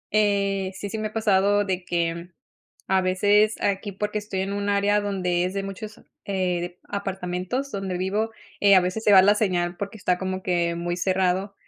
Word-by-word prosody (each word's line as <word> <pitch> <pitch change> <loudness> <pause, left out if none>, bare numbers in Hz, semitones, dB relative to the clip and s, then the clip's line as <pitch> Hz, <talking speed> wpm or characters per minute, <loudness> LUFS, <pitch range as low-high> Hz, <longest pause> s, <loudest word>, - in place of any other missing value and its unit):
Eh, 200 -2 +1
sí, 200 0 -6
sí 220 - -3
me 215 - -1
ha 215 - -13
pasado 205 -1 +2
de 185 -2 -2
que, 170 -1 0
mm, 170 +1 -9 0.6
a 190 0 +3
veces 205 +3 +3
aquí, 200 0 -1
porque 210 +2 -3
estoy 205 -2 -3
en 195 +1 -2
un 205 0 -1
área 205 +1 +2
donde 180 -3 0
es 180 - -2
de 195 0 -2
muchos, 205 +2 -8 0.2
eh, 185 -3 -1
dep 175 0 -6
apartamentos 195 +6 -3
donde 190 -2 -3
vivo, 205 +4 -1 0.3
eh, 200 -1 +6
a 185 - +7
veces 185 +5 -3
se 210 - +5
va 190 - +10
la 205 +2 +5
señal 175 -4 0
porque 200 +3 -6
está 180 -1 +1
como 185 0 -4
que 170 -2 0
muy 175 0 -2
cerrado, 190 +1 0
195 Hz, 200 wpm, -24 LUFS, 180-205 Hz, 0.6 s, va